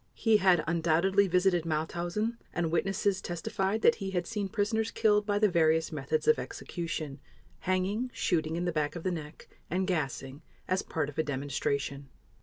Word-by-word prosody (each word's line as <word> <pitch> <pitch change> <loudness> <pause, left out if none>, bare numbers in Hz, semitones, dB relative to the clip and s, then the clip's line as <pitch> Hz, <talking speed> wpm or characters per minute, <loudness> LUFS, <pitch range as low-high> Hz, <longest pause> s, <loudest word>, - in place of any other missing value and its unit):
He 225 -2 +4
had 185 -5 +4
undoubtedly 170 +4 +3
visited 180 -1 +3
Mauthausen 175 +8 -2 0.2
and 170 -2 0
witnesses 195 +3 +1
testified 195 +5 -2
that - - +7
he 195 - -2
had 180 -2 -1
seen 205 -2 -3
prisoners 220 +2 0
killed 210 -2 +2
by 205 -1 +2
the 210 +1 +4
various 160 -3 +2
methods 465 - -2
of 460 - +5
execution, 160 -5 -5 0.5
hanging, 195 +7 0
shooting 160 -6 0
in 175 +1 -1
the 175 - +1
back 150 -1 -1
of 170 - -6
the 185 - 0
neck, 155 -3 -7 0.2
and 185 +3 0
gassing, 140 -5 -2 0.3
as 185 +1 +1
part 160 -3 -2
of 150 +1 -7
a - - +3
demonstration. 140 0 -2
175 Hz, 170 wpm, -30 LUFS, 160-200 Hz, 0.5 s, that